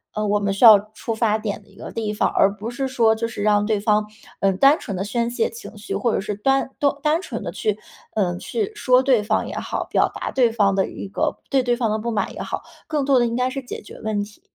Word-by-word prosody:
呃 215 0 -1
我 205 0 +2
们 200 -1 0
需 200 +5 +4
要 215 -3 +10
出 225 +1 -4
发 220 -1 +1
点 215 -1 -4
的 205 - -24
一 - - -21
个 - - -9
地 220 -2 -3
方， 210 - +1
而 200 - +3
不 215 +2 -6
是 265 +2 -2
说 235 -4 +3
就 230 +1 -2
是 230 -3 -5
让 205 -1 +3
对 215 -1 +1
方 210 0 +2 0.3
嗯 195 -1 +1
单 275 +7 +6
纯 200 - -5
地 190 - -2
宣 235 +3 -1
泄 245 - 0
情 455 - -11
绪， 210 - -6
或 240 - +1
者 - - +1
是 210 +1 -3
单- 270 +6 +1 0.3
单 310 +2 +2
纯 - - -6
地 - - -4
去 430 - -1 0.4
嗯 180 -4 0
去 435 - -3
说 255 -9 +3
对 255 -5 +4
方 215 +1 0
也 - - -6
好， - - -3
表 - - +2
达 - - -4
对 245 -3 +3
方 205 -4 +2
的 190 0 +1
一 - - -7
个 200 - -1
对 270 - +4
对 245 -1 +1
方 235 -3 0
的 215 - 0
不 235 +2 -3
满 215 - -1
也 - - -7
好， - - -4 0.2
更 300 -3 0
多 270 -2 +4
的 240 - +2
应 230 - -3
该 250 +1 +1
是 270 +1 -4
解 245 - -7
决 - - -12
问 215 -2 -1
题。 210 +1 -13
220 Hz, 290 characters per minute, -22 LUFS, 210-255 Hz, 0.4 s, 要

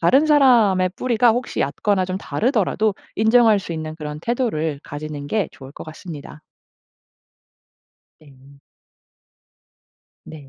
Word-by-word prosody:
다른 265 - +4
사람의 235 -11 +4
뿌리가 240 -1 +2
혹시 245 +2 -3
얕거나 190 +7 0
좀 185 +1 -4
다르더라도 215 -2 0 0.2
인정할 220 -1 +4
수 180 -3 -6
있는 155 -1 -5
그런 150 -1 -7
태도를 165 - -1
가지는 145 0 -7
게 205 +3 -1
좋을 135 0 -12
것 - - -10
같습니다. 155 -2 -10 1.8
네. 140 -2 -19 1.7
네. 150 -3 -12
185 Hz, 245 characters per minute, -21 LUFS, 150-225 Hz, 1.8 s, 다른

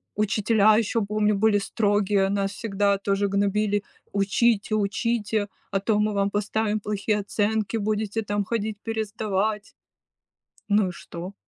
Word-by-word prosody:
Учителя 215 +1 +3
еще, 230 +1 +1
помню, 210 0 +1
были 210 0 +3
строгие, 205 -1 +1
нас 195 0 0
всегда 200 -2 0
тоже 200 0 0
гнобили: 205 +1 +1 0.3
"Учите, 205 +2 +1
учите, 215 0 0 0.2
а 195 - +1
то 205 +2 +1
мы 210 0 +1
вам 200 0 +1
поставим 210 +1 -1
плохие 210 +1 -1
оценки, 210 +2 -1
будете 215 0 -1
там 205 -1 -1
ходить 215 0 -2
пересдавать". 215 -2 -2 0.9
Ну 205 -2 +3
и - - -5
что? 175 +2 -8
205 Hz, 130 wpm, -25 LUFS, 200-215 Hz, 0.9 s, Учителя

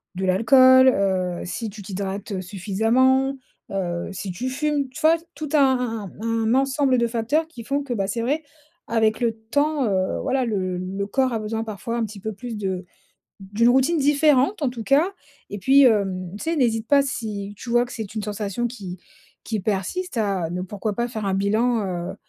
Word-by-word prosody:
de 190 +1 -2
l'alcool, 260 +7 +6
heu, 185 -5 0
si 220 +5 -4
tu 205 0 -10
t'hydrates, 195 +1 -5
heu, 190 -2 -2
suffisamment, 225 +8 +1 0.3
heu, 175 -3 -2
si 190 0 -5
tu 250 +9 -3
fumes, 285 0 -1
tu 260 +5 -10
vois? 320 +1 +5 0.2
Tout 305 -2 -5
un 250 -8 +2
un - - -18 0.2
un 230 +1 +1
ensemble 270 0 +2
de 235 - +2
facteurs 235 +7 0
qui 245 -8 -10
font 280 +4 -1
que, 270 -3 -3
bah, 195 -4 -1
c'est 230 +4 -2
vrai, 285 +7 0 0.5
avec 220 -2 +1
le 235 -2 +1
temps, 285 +7 0
heu, 190 -2 0
voilà, 260 -1 0
le 185 -5 -2
le 190 +2 -4
corps 260 +4 +1
a 225 - -1
besoin 220 +1 -3
parfois 225 +2 -4
un 230 - 0
petit 210 -1 -9
peu 220 +3 -4
plus 235 +3 -7
de 190 -3 -3 0.6
d'une 205 +5 +2
routine 265 +7 +3
différente, 290 +4 +3
en 285 - +1
tout 245 -2 -6
cas. 280 - +4 0.4
Et - - -5
puis, 270 +8 +5
hem, 195 -6 +2
tu - - -8
sais, 330 +1 0
n'hésite 230 -5 +1
pas, 285 +2 +5
si 210 -6 -4
tu 235 - -8
vois 240 +1 +3
que - - -11
c'est 220 -3 -6
une 215 - -3
sensation 210 +2 -3
qui 195 -7 -7 0.4
qui 220 - -3
persiste 215 - -2
à 195 -6 0
ne 180 +1 -3
pourquoi 205 +3 -3
pas 235 +3 -1
faire 220 -3 -5
un 195 - 0
bilan, 220 +5 +1 0.3
heu, - - -7
225 Hz, 200 wpm, -23 LUFS, 200-260 Hz, 0.6 s, l'alcool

